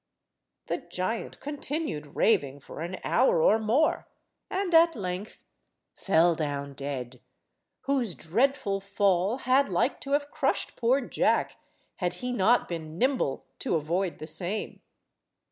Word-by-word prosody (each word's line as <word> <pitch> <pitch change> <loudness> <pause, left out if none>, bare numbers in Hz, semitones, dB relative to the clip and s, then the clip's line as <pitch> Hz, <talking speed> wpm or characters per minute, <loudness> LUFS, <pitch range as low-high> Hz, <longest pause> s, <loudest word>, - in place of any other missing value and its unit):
The - - -1
giant 205 +5 -4
continued 285 - -4
raving 145 -11 +2
for 150 - -9
an 175 +3 -4
hour - - +3
or 480 - +4
more, 235 +9 +1 0.4
and 380 -2 -2
at 330 0 +6
length 190 0 -5 0.5
fell 170 -2 +3
down 145 -3 -3
dead, 130 -3 -5 0.6
whose 260 -8 0
dreadful 205 - 0
fall 200 +1 +1
had 260 -1 +2
like 185 +9 0
to 275 - -3
have 290 0 0
crushed - - 0
poor 255 +4 +2
Jack 245 - +1 0.4
had 180 -1 -1
he 250 +7 -4
not 235 +2 +3
been 160 -2 -6
nimble 260 +5 0
to 260 - 0
avoid 170 +4 -1
the - - -7
same. 175 +6 -3
200 Hz, 130 wpm, -28 LUFS, 165-265 Hz, 0.6 s, at